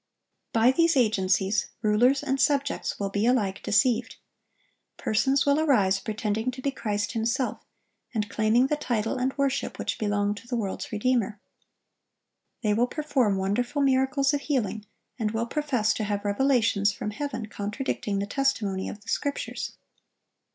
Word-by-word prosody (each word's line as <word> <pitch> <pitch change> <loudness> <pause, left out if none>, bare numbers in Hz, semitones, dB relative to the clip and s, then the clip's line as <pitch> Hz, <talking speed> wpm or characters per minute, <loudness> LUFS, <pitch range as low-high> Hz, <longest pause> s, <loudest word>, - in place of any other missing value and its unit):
By 230 +2 +5
these 335 +1 +3
agencies, 200 -3 +2 0.2
rulers 245 +7 +3
and 270 -2 0
subjects 280 0 0
will 200 -1 -2
be 205 +3 +1
alike 205 -6 +1
deceived. 235 +3 +2 0.8
Persons 270 +6 +1
will 285 +1 +3
arise 205 -11 +3
pretending 215 +2 -2
to 255 +1 -6
be 280 - +1
Christ 205 -5 -2
Himself, 235 +3 -1 0.5
and 215 -3 -1
claiming 220 +4 +3
the 300 - +1
title 235 -4 -1
and 260 +2 -1
worship 275 0 -1
which - - -3
belong 205 -1 +1
to 210 +3 -12
the 245 - -2
world's 205 -5 -3
Redeemer. 220 -1 0 1.2
They 210 -1 +2
will 235 +4 +2
perform 265 -9 0
wonderful 245 +9 0
miracles 270 +1 +2
of 285 - 0
healing, 220 -8 -2 0.3
and 220 -2 0
will 225 +2 -1
profess 250 -5 0
to - - -3
have 205 0 -2
revelations 215 -2 +2
from 210 +1 -5
heaven 235 -1 -4
contradicting 210 0 -3
the 200 - -1
testimony 210 -6 -1
of 205 - -9
the - - -21
Scriptures. 285 -1 -3
230 Hz, 150 wpm, -26 LUFS, 205-270 Hz, 1.2 s, By